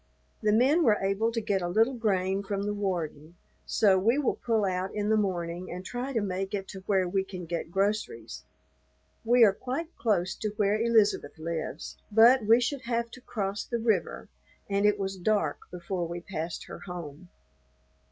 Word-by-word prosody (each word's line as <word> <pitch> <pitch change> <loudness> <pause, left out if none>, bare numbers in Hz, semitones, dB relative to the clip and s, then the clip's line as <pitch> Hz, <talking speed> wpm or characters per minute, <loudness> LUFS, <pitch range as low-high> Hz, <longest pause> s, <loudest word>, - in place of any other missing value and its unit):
The 210 - +2
men 260 +10 +4
were 215 -7 +4
able 195 +4 0
to 230 - -1
get 205 -3 0
a 175 - -1
little 225 +8 +3
grain 195 -5 0
from 200 0 -3
the 205 0 -1
warden; 170 -5 -3 0.3
so 195 -3 +4
we 230 +7 +2
will 290 -4 +1
pull 225 -3 +1
out 185 0 -1
in 210 0 -1
the 220 - +4
morning 180 -3 -2
and 180 +2 -7
try 245 +6 -4
to 230 -4 0
make 195 0 -2
it 195 -1 -4
to 190 - -7
where 190 -3 +2
we 190 +2 0
can 185 -2 -8
get 165 -1 -4
groceries. 170 - -2 0.8
We 240 +1 +5
are 205 -3 +6
quite 275 - -5
close 190 -5 +1
to 215 -1 -4
where 210 +1 +2
Elizabeth 220 -10 +2
lives, 160 -1 -5
but 230 +3 +6
we 230 +2 +7
should 250 +2 -1
have 235 -1 -1
to 255 - -12
cross 200 -4 -3
the 235 - -3
river, 220 -7 0 0.4
and 200 +1 +2
it 210 0 +3
was 195 -1 -3
dark 180 -5 0
before 175 0 -4
we 170 +1 -5
passed 170 -2 -5
her - - -9
home. 175 -2 -8
200 Hz, 185 wpm, -28 LUFS, 180-225 Hz, 0.8 s, we